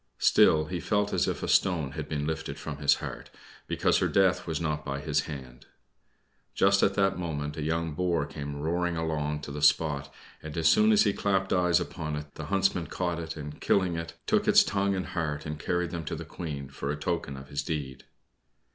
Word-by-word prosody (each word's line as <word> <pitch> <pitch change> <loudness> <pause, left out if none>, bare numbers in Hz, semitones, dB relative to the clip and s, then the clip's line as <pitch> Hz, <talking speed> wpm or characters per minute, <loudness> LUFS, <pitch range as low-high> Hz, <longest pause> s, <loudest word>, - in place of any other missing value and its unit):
Still 75 0 +5
he 90 +3 -4
felt 105 +2 0
as - - +2
if - - -2
a - - -1
stone 80 -7 +2
had - - -6
been 75 -1 -2
lifted 80 0 -3
from 75 -3 -6
his 70 -1 +4
heart, - - -7 0.4
because - - +2
her - - +2
death 95 -2 +2
was 80 -3 -1
not 75 -2 -2
by 70 -1 -3
his - - 0
hand. 65 -5 -9 0.9
Just 100 0 +4
at 100 - +3
that 95 -2 +2
moment 75 -4 -3
a 80 - -5
young 80 +1 -1
boar 85 -2 0
came 70 0 -6
roaring 85 +3 -1
along 75 -2 -2
to 75 - -7
the 75 +1 -5
spot, 75 -2 +2 0.3
and 80 0 -7
as 80 - +3
soon 215 +1 +5
as 215 0 +6
he - - +2
clapped 95 -1 0
eyes 90 -2 +3
upon 75 -1 -4
it 75 0 -7
the - - -7
Huntsman 95 -3 +1
caught 85 -2 -2
it, 80 -1 -6
and, 75 0 -8
killing 95 -3 +2
it, 85 0 -5
took - - +2
its - - +7
tongue 100 -1 0
and 95 - -2
heart 75 -4 -3
and 75 0 -5
carried 90 +1 -1
them 85 -1 -4
to - - -3
the - - -7
Queen, 75 -6 -6
for 70 +1 -5
a 75 - 0
token 75 -2 -3
of 65 0 -11
his 70 - -2
deed. 70 -4 -5
80 Hz, 215 wpm, -28 LUFS, 75-90 Hz, 0.9 s, its